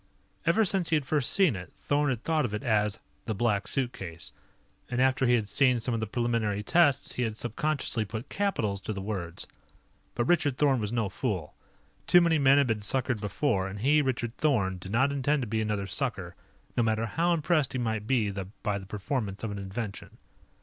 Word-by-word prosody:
Ever 215 +6 +4
since 190 -2 +1
he 165 - +3
had 150 -3 0
first 145 -2 +1
seen 185 - +3
it, 90 -1 -8
Thorn 145 0 +1
had 125 -3 -2
thought 160 -2 +1
of 110 -5 -2
it 105 - -5
as 105 -4 +1 0.3
"the 110 - -2
Black 105 -2 0
Suitcase," 105 -9 -4 0.6
and 125 - -2
after 130 0 +3
he 120 - +5
had 110 -3 -1
seen 125 +1 +3
some 120 +1 -2
of 115 - -1
the 110 - -2
preliminary 115 -3 -1
tests, 145 +2 +3
he - - -3
had 110 -3 -1
subconsciously 120 0 -1
put 110 +5 -6
capitals 110 - -1
to 110 - -4
the 100 - -5
words. 95 -5 -4 0.7
But 120 - 0
Richard 145 -7 +2
Thorn 140 -4 +3
was 105 -1 -2
no 115 -3 0
fool. 95 - -3 0.5
Too 175 - +7
many 170 -2 +3
men 140 0 +6
had 140 - +5
been 115 -3 0
suckered 120 +1 0
before, 105 -2 0
and 95 +2 -6
he, 150 +5 +4
Richard 125 -3 -2
Thorn, 100 -12 +1
did 95 +2 -8
not 135 +6 +3
intend 140 0 +1
to - - -4
be 110 +1 -1
another 105 -2 -1
sucker, 100 - -3 0.4
no - - +2
matter 110 0 +1
how 170 +9 0
impressed 155 -3 +1
he - - -1
might 110 -3 -2
be 115 -6 +2
by 100 +1 -4
the 95 - -11
performance 105 0 -3
of 110 - -2
an 100 - -5
invention. 100 +2 -6
120 Hz, 205 wpm, -28 LUFS, 105-140 Hz, 0.7 s, Too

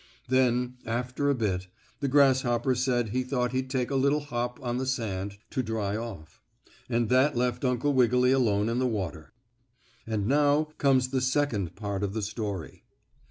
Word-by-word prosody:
Then, 125 -1 +2
after 125 +5 -1
a 140 - +3
bit, 95 -6 -1 0.3
the 140 - -1
grasshopper 130 -3 +3
said 125 -2 0
he 125 +4 0
thought 125 -2 -1
he'd 130 0 -2
take 130 -1 -1
a - - 0
little 140 +3 +2
hop 120 -3 -3
on 120 0 -1
the 130 - -2
sand 100 -6 -3
to 130 - 0
dry 110 -4 -2
off, 105 -9 -7 0.5
and 120 -1 +1
that 130 +2 +3
left 125 +1 0
Uncle 130 +3 +1
Wiggily 125 0 +4
alone 110 -6 +2
in 115 +2 0
the 130 - +2
water. 90 -9 -4 0.8
And 110 -3 -1
now 145 +4 +3
comes 130 -2 +3
the 130 -1 0
second 130 - 0
part 100 -1 -4
of 100 -1 -2
the 110 -1 -2
story. 100 -5 -5
125 Hz, 170 wpm, -28 LUFS, 110-130 Hz, 0.8 s, Wiggily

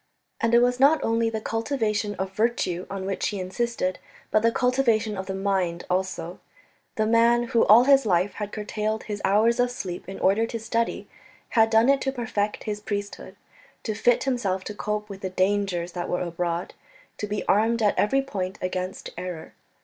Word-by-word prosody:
And 230 0 +2
it 240 - +6
was 245 0 +1
not 285 +4 +5
only 230 0 +1
the 220 -1 -3
cultivation 220 -3 -1
of 190 0 -4
virtue 195 -4 -1
on 195 -1 -5
which 195 0 -1
he 205 - -3
insisted, 185 0 -2 0.3
but 215 - +4
the 230 +1 +3
cultivation 230 -4 +1
of 190 -1 -5
the 190 - -3
mind 190 -3 -1
also. 180 -2 -2 0.6
The 215 - +1
man 235 +1 +3
who 230 - +3
all 225 +4 +8
his 275 0 +5
life 185 -1 +2
had 205 0 -3
curtailed 215 +1 -3
his 205 -1 -5
hours 220 +5 +3
of 245 0 +3
sleep 185 -7 -6
in 195 - -7
order 210 +4 +2
to 230 - -5
study, 230 +1 -2 0.4
had 225 -2 +4
done 225 +1 +4
it 275 0 +4
to 270 - 0
perfect 220 -5 -2
his 210 -1 -3
priesthood, 205 -1 -5 0.5
to 220 - -2
fit 230 +3 +2
himself 210 -8 -1
to 210 - -6
cope 210 0 -3
with 200 -2 -9
the 190 - -3
dangers 185 -2 0
that 175 0 -4
were 180 - -1
abroad, 170 0 -3 0.5
to 210 - -3
be 205 0 -3
armed 225 +3 +2
at 205 - +4
every 270 +6 +2
point 195 -7 -4
against 185 0 -4
error. 180 -3 -7
210 Hz, 190 wpm, -25 LUFS, 190-230 Hz, 0.6 s, all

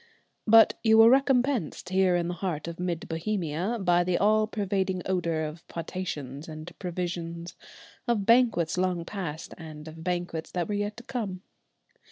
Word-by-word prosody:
But 225 0 +7
you 220 -1 +5
were 225 +1 +8
recompensed, 265 - +2
here 185 -1 +3
in 170 -1 0
the 175 - -2
heart 175 -4 -3
of 170 0 -6
mid 175 -2 -3
Bohemia, 175 +3 -2
by 175 -2 +3
the 175 0 +1
all 215 +1 +3
pervading 190 -3 -1
odour 170 -4 0
of 155 +2 -7
potations 155 -5 -5
and 155 +2 -8
provisions, 170 -1 -4 0.5
of 225 -5 +1
banquets 230 -8 +3
long 180 -2 0
past, 170 -6 -5
and 155 -1 -9
of 160 +1 -9
banquets 175 -2 -2
that 175 -2 -1
were 210 - -2
yet 205 +1 -2
to 235 - -9
come. 210 -8 -4
180 Hz, 160 wpm, -28 LUFS, 165-205 Hz, 0.5 s, were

